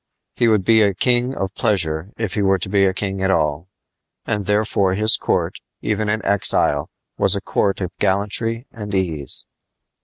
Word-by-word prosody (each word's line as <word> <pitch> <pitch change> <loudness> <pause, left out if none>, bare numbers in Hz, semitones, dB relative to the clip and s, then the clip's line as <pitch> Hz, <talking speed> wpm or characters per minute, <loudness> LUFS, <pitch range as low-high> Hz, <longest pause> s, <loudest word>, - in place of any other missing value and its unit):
He 120 - +1
would 105 -4 +2
be 110 -1 +5
a 100 -3 +2
king 125 +4 +1
of 95 0 -3
pleasure 90 -7 -1
if 110 -4 -3
he 105 - -1
were 95 -1 +3
to 90 - -5
be 100 -1 +3
king 95 0 -4
at 95 - +1
all. 80 -1 0 0.6
And 105 -2 -2
therefore 105 -2 +1
his 110 +2 +4
court, - - -1 0.2
even 110 0 -1
in 110 -1 -2
exile, 100 -2 +2 0.3
was 95 - +3
a - - -1
court 100 0 -1
of 90 -1 -4
gallantry 105 +4 0
and 105 -2 -6
ease. 80 -7 0
100 Hz, 175 wpm, -20 LUFS, 95-110 Hz, 0.6 s, be